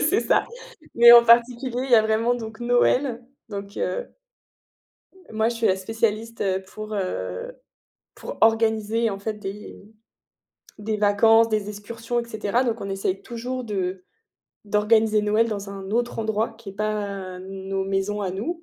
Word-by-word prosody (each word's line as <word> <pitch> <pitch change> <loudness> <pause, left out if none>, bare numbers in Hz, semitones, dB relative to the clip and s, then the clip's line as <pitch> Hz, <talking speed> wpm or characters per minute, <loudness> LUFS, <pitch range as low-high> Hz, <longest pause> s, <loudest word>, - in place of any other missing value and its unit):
C'est 365 +7 +2
ça. - - +2 0.5
Mais 235 0 +9
en 235 0 +9
particulier, 240 +2 +3
il 270 - -6
y - - +7
a 220 - +6
vraiment 220 +2 +1
donc 225 -1 -8
Noël, 245 +1 +1 0.3
donc 200 -1 -7
heu, - - -2 1.2
moi 220 +1 +1
je 235 - -3
suis 230 - +1
la 190 - +3
spécialiste, 225 +3 -2
heu, 190 -1 0
pour, 215 +2 -8
heu, 95 - -4 0.6
pour - - -8
organiser, 225 0 +2
en 195 - -5
fait, 215 +2 -3
des 210 0 -8 1.0
des 215 +1 -2
vacances, 220 +2 +4
des 215 -2 -1
excursions 230 +3 -4
et - - -9
cetera. 225 +1 -1
Donc 230 -3 -1
on 195 - -5
essaye 195 -1 -2
toujours 250 +2 -5
de 190 -3 -3 0.6
d'organiser 215 +1 +2
Noël 215 +2 +2
dans 200 -2 -5
un 195 0 -8
autre 240 0 -1
endroit 220 +1 -1
qui 220 -4 -9
est - - -12
pas 200 -3 -4
nos 195 0 -4
maisons 195 +2 -2
à 190 - -2
nous 325 - -4
215 Hz, 160 wpm, -23 LUFS, 200-230 Hz, 1.2 s, Mais